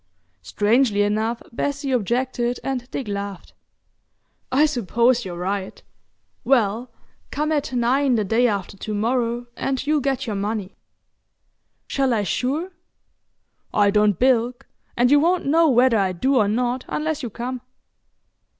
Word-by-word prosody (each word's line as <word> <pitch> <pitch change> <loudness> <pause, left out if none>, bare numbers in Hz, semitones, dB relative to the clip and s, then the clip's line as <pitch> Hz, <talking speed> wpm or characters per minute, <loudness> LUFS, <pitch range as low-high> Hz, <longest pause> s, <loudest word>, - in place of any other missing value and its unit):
Strangely 210 - +2
enough, 220 +3 -1
Bessie 280 +3 -2
objected 245 +1 0
and 255 -2 -3
Dick 265 - -5
laughed. 200 -2 -5 1.0
"I 280 +4 +4
suppose 240 -2 +1
you're 175 -2 -6
right. 190 +2 -4 0.6
Well, 235 -1 +1 0.4
come 300 +2 -2
at 295 -3 -1
nine 255 +2 +2
the 215 - +1
day 225 +5 +2
after 200 -3 -3
to 210 +2 -4
morrow 235 +2 0
and 270 -1 -2
you'll 300 0 +2
get 270 -2 -1
your 215 - -3
money." 205 -1 -3 1.1
"Shall 270 -3 0
I 210 - 0
sure?" 285 - -2 1.0
"I 205 -1 +4
don't 210 -2 +3
bilk, 250 +1 +1 0.3
and 245 +2 +3
you 290 - +7
won't 350 +4 +1
know 320 +3 +4
whether 245 -3 +4
I 190 -2 +1
do 265 +10 +1
or 210 -4 +3
not 245 +4 -1
unless 310 0 -2
you 245 - -4
come. 245 +3 -5
245 Hz, 140 wpm, -22 LUFS, 210-270 Hz, 1.1 s, you